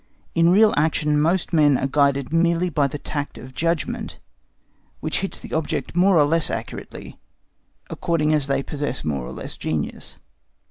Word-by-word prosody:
In 170 0 +4
real 210 +4 +5
action 150 -1 +2
most 170 +3 +1
men 145 -4 +5
are - - -1
guided 140 0 +1
merely 170 +1 +2
by 145 -2 +2
the 145 - -5
tact 145 0 -5
of 130 +1 -11
judgment 165 +1 -2 0.8
which 155 - -2
hits 195 - -4
the - - -10
object 160 +1 -2
more 185 +1 +4
or 150 - +6
less 165 +2 +1
accurately, - - -7 0.7
according 155 -2 0
as 150 -2 +1
they 135 0 0
possess 145 -2 -3
more 70 -4 -2
or - - -7
less - - -5
genius. 80 -2 -3
150 Hz, 165 wpm, -22 LUFS, 140-170 Hz, 0.8 s, or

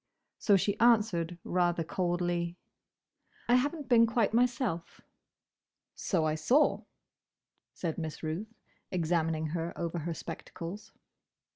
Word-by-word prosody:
So 200 -2 +5
she 205 +2 -1
answered 210 -8 +3
rather 175 -2 +1
coldly, 175 0 -1 0.9
"I 240 - +3
have 275 +6 +3
n't 295 -4 -8
been 230 -2 +6
quite 225 -2 +1
myself." 235 -8 0 0.9
"So 170 -5 0
I 155 - +1
saw," 245 - +2 0.9
said 165 -2 -3
Miss 160 -1 -5
Ruth, 170 +8 -3 0.4
examining 165 -2 0
her 165 +1 -3
over 170 0 -2
her 165 +1 -3
spectacles. 170 +5 -7
175 Hz, 115 wpm, -31 LUFS, 165-220 Hz, 0.9 s, been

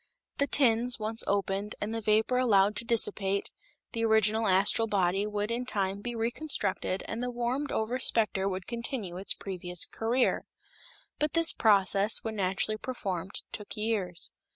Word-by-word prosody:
The 280 - +2
tins 245 -3 +4
once 220 +1 0
opened 200 +1 -1
and 210 +2 -3
the 225 - -3
vapor 220 +4 +2
allowed 210 -4 +3
to - - 0
dissipate, 200 -4 0 0.4
the 230 -2 -2
original 220 0 +3
astral 195 +4 +3
body 195 0 +1
would 210 +1 -2
in 240 +2 -1
time 200 -4 -2
be 240 +2 -5
reconstructed 230 -5 0
and 230 - -4
the 250 - -2
warmed 245 +4 -2
over 230 +4 -1
specter 210 -6 +2
would 185 -1 -5
continue 235 -6 -4
its 190 - -1
previous 180 -2 -1
career. 240 +3 0 0.7
But 300 0 0
this 330 0 +4
process, 200 0 +3
when 220 -1 -4
naturally 195 +3 0
performed, 195 -7 -5
took 210 -1 -7
years. 205 -6 -2
215 Hz, 155 wpm, -29 LUFS, 195-235 Hz, 0.7 s, tins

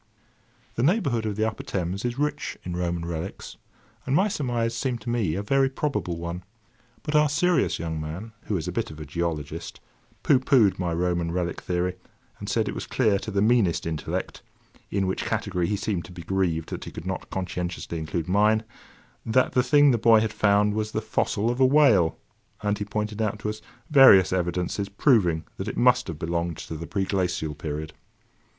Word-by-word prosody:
The - - -2
neighbourhood 140 - +1
of 105 - -2
the 110 +1 +1
upper 110 - -4
Thames 95 +1 -3
is 120 +1 -2
rich 150 0 -2
in 90 -1 -4
Roman 85 -1 -2
relics, 85 +2 -6 0.5
and 135 - +2
my 190 +6 +4
surmise 120 - -1
seemed 120 0 -2
to 120 - -4
me 105 -10 0
a 100 - -2
very 135 +5 +2
probable 130 - -2
one; 85 +1 -5 0.6
but 150 - -2
our 150 0 +5
serious 170 +3 +2
young 80 -1 -4
man, 85 +9 -6
who 105 - -1
is 80 0 -4
a - - -2
bit 115 +6 -2
of 80 -1 -10
a 75 - -6
geologist, 80 +1 -4 0.4
pooh 135 - +5
poohed 125 -9 +3
my 90 -2 -1
Roman 85 0 0
relic 85 -1 -2
theory, 90 0 -1 0.4
and 100 - -6
said 110 +2 +1
it - - -2
was - - -6
clear 110 -6 +2
to - - -6
the 100 -1 +1
meanest 110 -7 +2
intellect 80 -2 -4 0.5
(in 100 -1 0
which 95 - -2
category 90 -2 -1
he 105 - 0
seemed 100 -3 -2
to 90 - -12
be 90 -2 -9
grieved 90 -4 -1
that - - -6
he - - -6
could 80 - -8
not 95 0 -4
conscientiously 90 -2 -4
include 80 +1 -3
mine) 105 +4 +3 0.6
that 120 +3 +2
the 125 - +3
thing 145 +2 +5
the 120 - +1
boy 115 0 +6
had 110 0 -1
found 105 0 +3
was 110 0 -2
the - - 0
fossil 110 +1 0
of 120 - -4
a 130 - +6
whale; 125 - +4 0.5
and 105 0 0
he 105 - -2
pointed 105 +1 -3
out 105 -1 0
to 105 - -3
us 110 - -9 0.3
various 130 - +8
evidences 90 +2 -1
proving 100 - +3
that - - -4
it - - -4
must - - +4
have 80 - -5
belonged 85 0 -2
to 80 - -7
the 80 +2 -6
preglacial 90 -5 -1
period. 75 +1 -5
100 Hz, 195 wpm, -25 LUFS, 85-115 Hz, 0.6 s, various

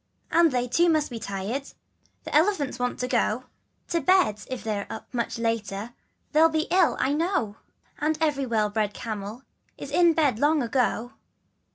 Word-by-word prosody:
And 335 -1 +5
they 250 -1 0
too 340 +8 +3
must 310 -4 +1
be 235 - -5
tired 200 +6 -3
dear, 275 - -15 0.5
The - - -5
elephants 305 - +2
want 245 0 -1
to 250 - -1
go 245 -1 0 0.5
To 335 -1 0
bed, 300 - +3
if 255 -1 -5
they're 210 -3 -2 0.3
much 235 -1 -2
later, 225 -1 -2 0.4
They'll 310 +1 +5
all - - +5
be 315 0 0
ill 365 -1 +3
I 275 - +1
know, 305 - -1 0.4
And 310 0 0
every 290 -4 0
well 215 -3 +1
bred 210 -1 -1
camel, 215 +1 -6 0.3
Is - - -8
in 345 -2 +5
bed 285 -8 +2
long 295 0 +3
ago. 245 -1 0
255 Hz, 175 wpm, -26 LUFS, 225-315 Hz, 0.5 s, And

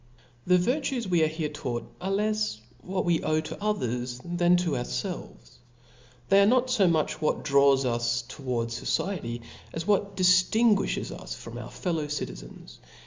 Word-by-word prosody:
The 180 0 +6
virtues 250 +4 0
wc 175 -4 +2
are - - +2
here 155 -1 -3
taught, 120 -5 -4
are 190 - -2
lefs 210 - 0 0.2
what 185 +5 -2
wc 170 -2 +2
owe 155 0 +2
to 160 +6 -8
others, 125 - -2
than 175 0 +3
to 175 -2 0
ourfelves, 120 - -5 0.7
they 195 0 +6
are 200 - +5
not 255 +2 +3
fo 210 -7 +4
much 160 -3 0
what 155 - 0
draws 140 -2 +4
us 120 0 0
towards 120 -2 -4
focietv, 120 -12 -2 0.3
as 165 0 -4
what 200 -1 +1
diftinguifhcs 195 +4 +3
us - - -7
from - - -9
our - - -7
fellow 165 -5 -2
citizens. - - -7
165 Hz, 155 wpm, -27 LUFS, 125-195 Hz, 0.7 s, The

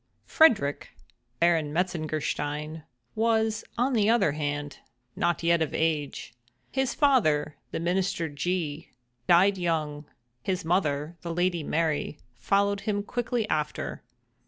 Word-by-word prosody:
Frederick, 210 - +3 0.4
Baron 165 -3 +3
Metzengerstein, 155 -2 -2 0.3
was, 220 -1 +1
on 255 +3 +1
the 215 -3 +3
other 230 -10 +4
hand, 145 -1 -3 0.4
not 175 -1 0
yet 170 0 +3
of 160 - -1
age. 155 -6 -1 0.4
His 265 -1 0
father, 155 - +2
the - - -4
Minister 175 0 0
G—, 160 +1 -3 0.4
died 190 +3 +5
young. 155 -4 -1 0.4
His 185 +3 -2
mother, 160 -2 0
the 170 - -4
Lady 175 0 0
Mary, 155 -1 -1 0.2
followed 200 - +1
him 205 -1 -1
quickly 240 0 -2
after. 150 -4 -2
170 Hz, 115 wpm, -27 LUFS, 150-200 Hz, 0.4 s, died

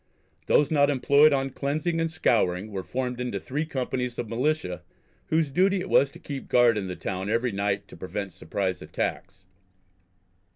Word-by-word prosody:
Those 145 0 +3
not 145 -2 +4
employed 140 +2 +5
on 135 -1 0
cleansing 155 +6 -1
and 165 - 0
scouring 110 - +1
were 95 -2 -3
formed 125 +4 -3
into 120 -5 -2
three 150 +9 -3
companies 125 -3 -3
of 120 - -3
Militia 120 - -1 0.5
whose 160 -2 +1
duty 190 +6 +3
it - - -5
was 140 - +5
to - - -13
keep 140 -2 -6
guard 120 -2 +5
in 100 -3 -2
the 90 - -4
town 95 +2 -4
every 115 +2 +1
night, 100 0 -1
to - - -11
prevent 100 0 -5
surprise 95 +2 -3
attacks. 95 0 -4
125 Hz, 170 wpm, -26 LUFS, 100-145 Hz, 0.5 s, employed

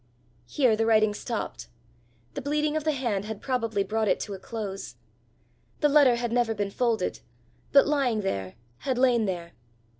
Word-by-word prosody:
Here 250 - +3
the 225 +1 0
writing 215 -2 +4
stopped: 230 +1 -5 0.7
the - - -4
bleeding 300 +2 0
of 310 -1 -2
the 310 - +3
hand 235 -8 -2
had 220 -1 -5
probably 230 -6 -1
brought 215 +2 -1
it - - +2
to 205 - -5
a 190 - -7
close. 200 -2 -6 0.9
The 295 - +4
letter 280 -4 +6
had 240 -1 -2
never 235 -2 +1
been 200 -1 -2
folded, 235 0 0 0.5
but 275 - +7
lying 270 -7 +1
there, 95 - -3 0.2
had 260 -3 -2
lain 245 -3 +3
there. 175 -3 -4
230 Hz, 170 wpm, -27 LUFS, 205-260 Hz, 0.9 s, but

